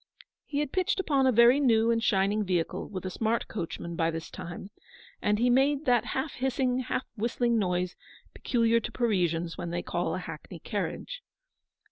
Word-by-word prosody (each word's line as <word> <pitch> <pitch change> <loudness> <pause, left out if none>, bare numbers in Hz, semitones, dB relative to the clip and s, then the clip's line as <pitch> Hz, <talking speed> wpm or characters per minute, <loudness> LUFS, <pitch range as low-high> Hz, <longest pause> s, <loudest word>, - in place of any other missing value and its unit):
He 290 0 -1
had 295 -2 -3
pitched 370 +1 0
upon 280 -7 +2
a - - +5
very 235 +3 +6
new 230 -4 +4
and 230 -1 +1
shining 205 +1 +2
vehicle, 180 -4 -1
with 190 -2 -6
a 185 - -3
smart 225 +4 0
coachman, 170 -3 -5
by 165 0 +1
this 165 0 -5
time, 175 +4 -8 0.5
and 210 0 +2
he 240 +3 +2
made 275 +4 +3
that 245 -3 +3
half 270 +4 -2
hissing, 255 0 0
half 255 0 -2
whistling 235 +1 +1
noise 180 -2 -1 0.4
peculiar 230 -1 +2
to - - -6
Parisians 175 -8 0
when 175 - -3
they 175 +1 -3
call - - -1
a - - -2
hackney - - -8
carriage. - - -4
230 Hz, 175 wpm, -28 LUFS, 185-255 Hz, 0.5 s, very